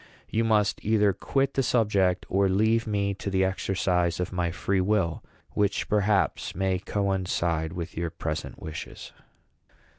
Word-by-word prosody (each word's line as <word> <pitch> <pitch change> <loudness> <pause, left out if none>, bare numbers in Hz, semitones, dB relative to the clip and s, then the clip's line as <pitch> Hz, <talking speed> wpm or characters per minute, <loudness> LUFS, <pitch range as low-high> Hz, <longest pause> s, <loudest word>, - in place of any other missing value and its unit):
You 115 - +1
must 105 -3 +2
either 105 -2 +3
quit 135 +7 0
the 135 - +2
subject, 100 -7 +2
or 95 +1 +2
leave 110 +4 +2
me 100 -1 0
to 100 - -5
the 95 -1 +2
exercise 90 -2 0
of 90 +1 -2
my 90 -1 0
free 95 +3 0
will, 95 -4 0 0.3
which, 105 -1 0
perhaps, 105 -1 +1
may 95 0 0
coincide 90 -5 -1
with 85 -2 -6
your 85 0 -2
present 80 -1 -5
wishes." 80 0 -7
95 Hz, 145 wpm, -27 LUFS, 90-105 Hz, 0.3 s, either